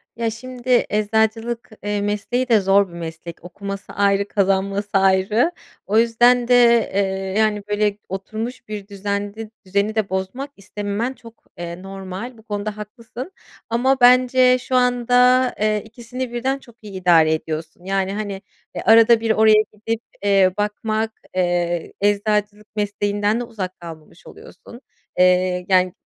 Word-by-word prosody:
Ya, 230 0 -1
şimdi 250 +2 -1
eczacılık 220 +3 0
eee, 205 0 -1
mesleği 210 +5 -2
de 220 -2 +5
zor 195 +1 +3
bir 170 - -15
meslek. 165 0 -8
Okuması 195 +2 -7
ayrı, 200 0 +2
kazanması 195 +1 0
ayrı. 195 - +3 0.3
O 210 +2 +1
yüzden 240 +1 +4
de, 240 -2 +5
eee, 190 -1 -1
yani, 215 -2 +1
böyle, 210 0 0
oturmuş 220 +6 -6
bir 210 -2 -6
düzende 205 +2 -4 0.2
düzeni 200 +3 0
de 215 -3 0
bozmak 190 +9 -4
istememen 205 +5 -4
çok, 230 -2 -16
eee, 175 +1 -7
normal. 195 +5 -7
Bu 220 - -17
konuda 210 -1 -4
haklısın 230 - -9 0.4
ama 260 +3 +1
bence 255 +1 +5
şu 255 - -3
anda, 250 +1 +3
eee, 215 -1 +1
2'sini 240 +2 -7
birden 265 +3 -1
çok 235 -4 -18
iyi 205 -2 -10
idare 170 -4 +4
ediyorsun, 160 +2 -5
yani, 195 0 -1
hani, 200 -2 -4 0.3
eee, - - -3
arada 230 0 +6
bir 225 -1 0
oraya 215 -1 +5
gidip, 220 +2 -4 0.2
eee, 195 -2 +4
bakmak, 215 +1 -1 0.2
eee, 175 -2 -1
eczacılık 210 +1 0
mesleğinden 205 +1 0
de 245 - -2
uzak 195 -6 -6
kalmamış 165 -3 -12
oluyorsun, 240 +3 -14 0.4
eee, 180 0 +3
yani, 185 -1 +3
210 Hz, 140 wpm, -21 LUFS, 195-235 Hz, 0.4 s, arada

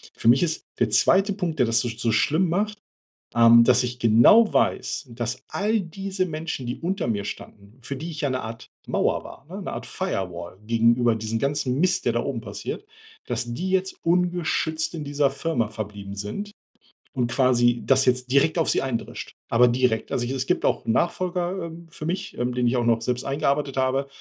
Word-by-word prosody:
Für - - -3
mich 125 +7 +6
ist 160 -2 -2
der 120 - +2
zweite 195 - +4
Punkt, 180 -5 -3
der 125 - +4
das 115 0 +3
so 120 - -1
so 115 0 -1
schlimm 160 +10 +2
macht, 210 +4 -1 0.6
ähm, 115 0 +7
dass 125 +1 +4
ich 125 0 -4
genau 120 - +6
weiß, 135 - 0
dass 115 0 -4
all 215 +2 0
diese 190 +2 -3
Menschen, 155 -5 -4
die 120 - -4
unter 180 -5 -2
mir 105 -3 -1
standen, 100 +2 -9
für 140 +3 -5
die 155 +6 -6
ich 150 - -6
ja 145 - 0
'ne 130 0 -2
Art 115 +1 -8 0.2
Mauer - - 0
war, - - -12 0.2
'ne - - -5
Art - - -6
Firewall 90 - -4
gegenüber 115 +1 +3
diesem 110 +1 -3
ganzen 140 -1 -1
Mist, 185 +2 +1
der - - +2
da - - 0
oben - - -3
passiert, - - -6 0.4
dass 120 -1 -3
die 180 +10 -3
jetzt 190 0 0
ungeschützt 170 -2 0
in 155 - -5
dieser 145 -1 +1
Firma 140 -4 -1
verblieben 105 -2 -7
sind 105 - -5 0.6
und 125 -3 -1
quasi 120 -2 +3
das 135 0 +4
jetzt 125 0 +1
direkt 140 +5 +3
auf 165 - +2
sie - - +2
eindrischt, 130 -4 -4 0.2
aber 125 +1 +5
direkt. 120 -2 0
Also, 120 - 0
es 130 +1 -2
gibt 180 - 0
auch - - 0
'n 115 - +1
Nachfolger, 180 +4 -1
ähm, 170 0 -10
für 155 - -8
mich, 190 +4 -4
ähm, 125 +1 -1
den 125 0 +1
ich 120 - +1
auch 120 - 0
noch 115 -1 +2
selbst 125 +2 -2
eingearbeitet 140 0 -1
habe. 135 +1 +1
130 Hz, 200 wpm, -24 LUFS, 120-170 Hz, 0.6 s, ähm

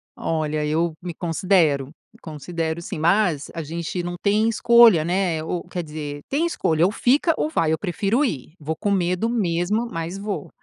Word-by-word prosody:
Olha, 155 -2 -2
eu 160 +2 0
me 175 -1 -5
considero, 165 -5 +1 0.3
me - - -21
considero 160 +1 -4
sim, 160 - -6
mas 170 -4 +2
a 165 - -4
gente 170 +3 -4
não 175 0 -4
tem 210 +2 +2
escolha, 230 -6 +6
né? 175 -3 0
Ou, 170 +1 -3
quer 180 -1 -4
dizer, 150 -2 -6
tem 295 +5 +1
escolha: 165 - +1
ou 195 - +2
fica 280 +9 +2
ou 305 - 0
vai. 165 - +1
Eu - - +1
prefiro 200 - 0
ir, 155 - -4
vou 155 +1 -3
com 205 +3 -2
medo 185 +3 0
mesmo, 205 +1 0
mas 165 +3 -4
vou. 200 -7 -5
175 Hz, 180 wpm, -22 LUFS, 160-200 Hz, 0.3 s, escolha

